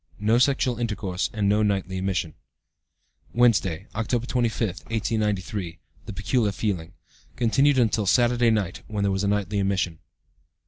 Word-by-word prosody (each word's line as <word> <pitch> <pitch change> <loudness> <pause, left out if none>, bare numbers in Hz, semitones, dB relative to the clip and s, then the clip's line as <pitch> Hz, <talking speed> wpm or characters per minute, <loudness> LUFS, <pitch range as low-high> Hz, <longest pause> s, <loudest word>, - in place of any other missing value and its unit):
No 110 +3 +2
sexual 130 -2 +2
intercourse, 105 -5 -2
and 105 -2 -1
no 105 +2 +3
nightly 95 -3 0
emission.) 95 -5 -2 1.0
"Wednesday, 100 -7 +2
October 115 +2 -1
25, 120 -3 0 0.2
1893. 105 -5 -2 0.3
The - - -4
peculiar 115 -5 0
feeling. 95 -5 -3 0.4
(Continued 135 +4 +3
until 110 -4 +2
Saturday 120 +1 +3
night, 105 -5 -1
when 105 -2 -2
there 100 - +2
was 95 +1 -1
a - - +1
nightly 105 0 0
emission.) 95 -4 -1
105 Hz, 135 wpm, -25 LUFS, 95-115 Hz, 1.0 s, no